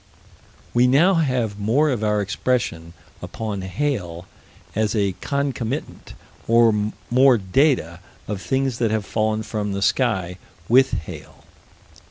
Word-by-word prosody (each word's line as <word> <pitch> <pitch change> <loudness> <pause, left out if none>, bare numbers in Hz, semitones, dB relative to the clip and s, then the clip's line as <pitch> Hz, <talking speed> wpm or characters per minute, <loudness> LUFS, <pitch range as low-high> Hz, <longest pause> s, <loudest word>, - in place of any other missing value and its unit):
We 120 +1 +4
now 155 +9 +4
have 125 - 0
more 135 +9 +2
of 115 -4 -2
our 105 -1 +1
expression 100 -6 -2 0.3
upon 105 -3 -5
hail 95 -6 -3 0.5
as 110 +1 0
a 100 -3 +1
concomitant, 140 -2 -3 0.3
or 110 -2 +3 0.2
more 130 0 +5
data 95 - +1 0.3
of 100 -2 -4
things 130 +5 -1
that 115 -2 +1
have 110 -1 -1
fallen 110 0 -1
from 105 -2 -3
the 100 0 -2
sky, 95 -9 0 0.3
with 130 +3 +5
hail. 80 - -7
110 Hz, 125 wpm, -22 LUFS, 100-130 Hz, 0.5 s, more